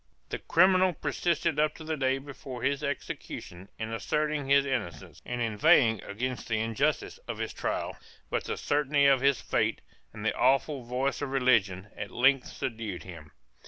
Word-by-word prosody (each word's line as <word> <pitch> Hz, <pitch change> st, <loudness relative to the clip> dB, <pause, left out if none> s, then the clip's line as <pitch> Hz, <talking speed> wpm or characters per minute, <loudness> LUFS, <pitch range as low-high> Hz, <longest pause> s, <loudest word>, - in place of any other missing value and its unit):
The -, -, -3 dB
criminal 185 Hz, +1 st, +4 dB
persisted 165 Hz, -2 st, -1 dB
up 150 Hz, 0 st, +2 dB
to 160 Hz, -, -10 dB
the 160 Hz, 0 st, -2 dB
day 135 Hz, -2 st, +1 dB
before 135 Hz, -2 st, -8 dB
his 140 Hz, +2 st, 0 dB
execution 100 Hz, -9 st, -5 dB
in 110 Hz, 0 st, -4 dB
asserting 150 Hz, +3 st, -1 dB
his 140 Hz, 0 st, +5 dB
innocence, 130 Hz, -10 st, -4 dB
and 120 Hz, 0 st, -3 dB
inveighing 115 Hz, -, +4 dB
against 125 Hz, +5 st, -4 dB
the 110 Hz, -, 0 dB
injustice 115 Hz, +6 st, -1 dB
of -, -, -4 dB
his -, -, -4 dB
trial, -, -, -3 dB, 0.4 s
but -, -, -1 dB
the -, -, -3 dB
certainty 145 Hz, 0 st, +2 dB
of 135 Hz, -2 st, +5 dB
his 140 Hz, -1 st, +3 dB
fate, -, -, 0 dB, 0.3 s
and 105 Hz, -, -8 dB
the -, -, +2 dB
awful 135 Hz, +3 st, +2 dB
voice 130 Hz, +4 st, -1 dB
of 145 Hz, -, -2 dB
religion, 110 Hz, -8 st, +2 dB
at 100 Hz, -, -5 dB
length 130 Hz, +5 st, +3 dB
subdued 110 Hz, -6 st, -5 dB
him. 80 Hz, -5 st, -10 dB
135 Hz, 165 wpm, -29 LUFS, 115-145 Hz, 0.4 s, his